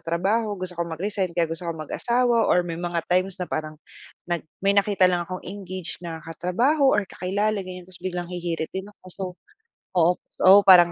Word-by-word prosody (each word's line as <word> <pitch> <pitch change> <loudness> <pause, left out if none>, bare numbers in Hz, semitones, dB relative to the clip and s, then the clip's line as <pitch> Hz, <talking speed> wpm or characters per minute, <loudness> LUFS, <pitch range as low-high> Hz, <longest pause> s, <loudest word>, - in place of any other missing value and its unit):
trabaho, 200 +6 0
gusto 185 0 -2
ko 170 - -1
mag-resign 185 +3 -2
kaya 170 - +4
gusto 165 +2 -4
ko - - 0
mag-asawa 235 +8 +1
or 180 0 +4
may 165 -1 -4
mga 175 -1 -2
times 185 +1 +1
na 180 - -2
parang 155 -1 -4 0.5
nag 175 -1 -1 0.2
may 200 - +5
nakita 200 -2 +4
lang 180 -1 +1
akong 185 0 -6
engage 185 -3 -6
na 165 -2 -5
katrabaho 240 - +2
or 210 - +1
kakilala 200 +4 -1
ganyan, 185 -1 -8
tapos 185 -1 -8
biglang 180 -1 -3
hihirit 170 -2 -3
din 190 +1 -4
ako 205 - -30
so, 195 - -5 0.7
oo 170 0 +5 0.3
oo 190 +2 +10
parang 175 -2 +9
180 Hz, 185 wpm, -24 LUFS, 175-200 Hz, 0.7 s, oo